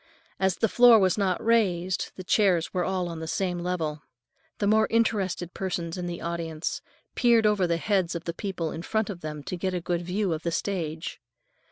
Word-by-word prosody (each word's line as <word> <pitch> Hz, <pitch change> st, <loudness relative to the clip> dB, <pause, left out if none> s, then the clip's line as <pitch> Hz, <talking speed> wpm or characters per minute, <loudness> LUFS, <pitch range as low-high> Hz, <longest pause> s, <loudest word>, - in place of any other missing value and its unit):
As 190 Hz, -2 st, +2 dB
the 225 Hz, -, +1 dB
floor 240 Hz, +1 st, +7 dB
was 190 Hz, -4 st, +3 dB
not 195 Hz, -2 st, 0 dB
raised, 190 Hz, -6 st, +1 dB
the 185 Hz, -, -7 dB
chairs 180 Hz, -3 st, +2 dB
were 180 Hz, -1 st, 0 dB
all 185 Hz, -1 st, -1 dB
on 165 Hz, -1 st, -6 dB
the 160 Hz, -, -5 dB
same 180 Hz, +1 st, -1 dB
level. 165 Hz, -4 st, -2 dB, 0.6 s
The 205 Hz, -, -1 dB
more 220 Hz, +1 st, +4 dB
interested 200 Hz, -6 st, 0 dB
persons 175 Hz, -3 st, -3 dB
in 180 Hz, -1 st, -4 dB
the 170 Hz, 0 st, -5 dB
audience 165 Hz, -2 st, -3 dB, 0.3 s
peered 235 Hz, -2 st, +4 dB
over 205 Hz, -4 st, +3 dB
the 170 Hz, -1 st, +1 dB
heads 185 Hz, -2 st, 0 dB
of 170 Hz, -, -4 dB
the 170 Hz, -, -3 dB
people 170 Hz, -4 st, -3 dB
in 160 Hz, -, -5 dB
front 220 Hz, +3 st, -1 dB
of 175 Hz, -3 st, -9 dB
them 150 Hz, -1 st, -6 dB
to 180 Hz, -, -4 dB
get 185 Hz, +1 st, -2 dB
a -, -, 0 dB
good 175 Hz, 0 st, -2 dB
view 180 Hz, +1 st, -1 dB
of 155 Hz, -, -4 dB
the 170 Hz, -, -1 dB
stage. 165 Hz, -4 st, -3 dB
180 Hz, 205 wpm, -27 LUFS, 170-200 Hz, 0.6 s, floor